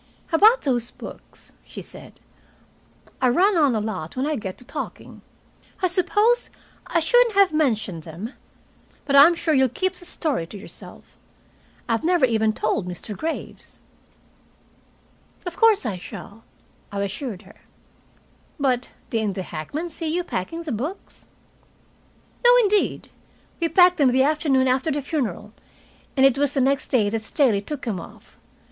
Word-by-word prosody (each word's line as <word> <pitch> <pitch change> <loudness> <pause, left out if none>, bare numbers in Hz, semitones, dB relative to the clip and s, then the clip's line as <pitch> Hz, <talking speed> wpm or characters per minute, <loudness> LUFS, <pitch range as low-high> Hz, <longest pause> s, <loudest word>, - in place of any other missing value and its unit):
"About 435 +9 +6
those 245 -4 -1
books," - - -12
she - - -10
said. - - -13 1.0
"I 255 - +4
run 375 +10 +3
on 290 -7 +3
a - - +1
lot 210 -4 -5
when 260 - 0
I 305 0 0
get 190 -7 -6
to 250 - -13
talking. - - -7 0.6
I 370 - +2
suppose 415 +6 +1 0.4
I 335 - +1
shouldn't 470 +6 +3
have 395 -4 +5
mentioned 220 - 0
them. 175 - -8 0.7
But 280 - +1
I'm 300 +5 +8
sure 325 -1 0
you'll 265 -2 +4
keep 375 +10 -1
the 360 - -12
story 290 - -2
to 205 - -9
yourself. 200 - -12 0.7
I've 230 -1 0
never 345 -4 +4
even 220 -2 +1
told 215 -3 -1
Mr. 180 +4 -6
Graves." 320 - -6 1.6
"Of 350 -1 -5
course 445 - +4
I 205 -5 -2
shall," 205 +3 -10 0.5
I 200 - -4
assured 210 0 -5
her. - - -18 1.0
"But 255 -3 0 0.2
didn't 220 -4 -1
the 190 - -3
hackman 230 - -5
see 325 +1 -5
you 345 +3 -1
packing 330 - -4
the 315 - -5
books?" 285 - -6 1.2
"No, 485 - +7
indeed. 420 -4 +1 0.5
We 335 -1 0
packed 360 0 +5
them 280 -5 +4
the 260 +1 +3
afternoon 280 -3 +2
after 260 +4 +1
the 290 -1 -2
funeral, 220 - -3 0.6
and 265 - +6
it 270 0 +4
was 285 -1 +1
the 275 - 0
next 270 +1 +1
day 225 -6 +2
that 225 0 -2
Staley 220 -3 +1
took 285 +6 -6
them 215 -7 -2
off. - - -14
270 Hz, 155 wpm, -23 LUFS, 220-335 Hz, 1.6 s, I'm